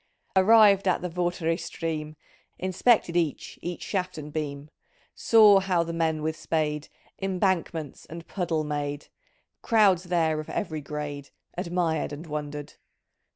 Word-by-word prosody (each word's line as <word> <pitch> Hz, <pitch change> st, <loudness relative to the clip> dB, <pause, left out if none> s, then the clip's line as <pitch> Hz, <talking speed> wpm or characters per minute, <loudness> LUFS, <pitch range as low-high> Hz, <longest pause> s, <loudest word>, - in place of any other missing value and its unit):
"Arrived 200 Hz, 0 st, +6 dB
at 180 Hz, -, +1 dB
the 180 Hz, -, -2 dB
Vartry 175 Hz, -1 st, -1 dB
stream. 160 Hz, -2 st, -4 dB, 0.4 s
Inspected 185 Hz, 0 st, +2 dB
each 165 Hz, -5 st, -1 dB
each 175 Hz, 0 st, -5 dB
shaft 185 Hz, -3 st, -3 dB
and 150 Hz, -1 st, -8 dB
beam; 145 Hz, -1 st, -4 dB, 0.4 s
Saw 215 Hz, -3 st, +6 dB
how 185 Hz, -3 st, +1 dB
the 170 Hz, 0 st, -5 dB
men 160 Hz, -2 st, 0 dB
with 160 Hz, 0 st, -1 dB
spade 150 Hz, -2 st, -2 dB, 0.3 s
Embankments 180 Hz, -6 st, -1 dB
and 165 Hz, +1 st, -9 dB
puddle 170 Hz, -5 st, -1 dB
made; 145 Hz, -1 st, -4 dB, 0.5 s
Crowds 200 Hz, -6 st, +3 dB
there 165 Hz, -3 st, +1 dB
of 155 Hz, -, -7 dB
every 160 Hz, -8 st, -3 dB
grade 145 Hz, -1 st, -6 dB, 0.3 s
Admired 170 Hz, -4 st, -1 dB
and 145 Hz, +3 st, -7 dB
wondered. 150 Hz, -1 st, -5 dB
165 Hz, 130 wpm, -26 LUFS, 150-185 Hz, 0.5 s, Arrived